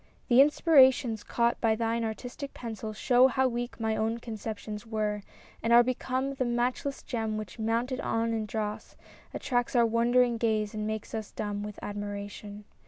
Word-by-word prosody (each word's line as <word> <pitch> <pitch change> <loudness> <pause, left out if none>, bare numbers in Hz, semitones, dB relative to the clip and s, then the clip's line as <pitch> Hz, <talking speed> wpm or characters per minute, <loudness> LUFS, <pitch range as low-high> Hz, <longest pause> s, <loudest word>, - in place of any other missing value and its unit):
— - - -35
The 245 +2 +7
inspirations 265 -6 +5
caught 235 0 0
By 225 -2 +3
thine 230 +1 -1
artistic 245 +5 -5
pencil 220 -2 -6
show 245 +4 +4
how 265 +1 +2
weak 240 0 -4
My 220 -1 0
own 225 +1 0
conceptions 220 -2 -6
were, 215 -2 -2 0.4
and 230 - 0
are 240 +1 +8
become 255 +2 -2
The 265 - -1
matchless 245 +3 -1
gem 225 -3 -2
which, 215 -1 -7
mounted 235 +4 -1
e'en 230 -2 0
in 220 -1 -2
dross. 210 0 -4 0.4
Attracts 245 0 -1
our 235 -1 +5
wondering 235 +1 +3
gaze 215 -2 0
and 215 0 -3
makes 220 -1 -4
us 220 -2 -4
dumb 205 -1 -4
With 210 0 -6
admiration. 205 0 -6
230 Hz, 170 wpm, -29 LUFS, 215-245 Hz, 0.4 s, are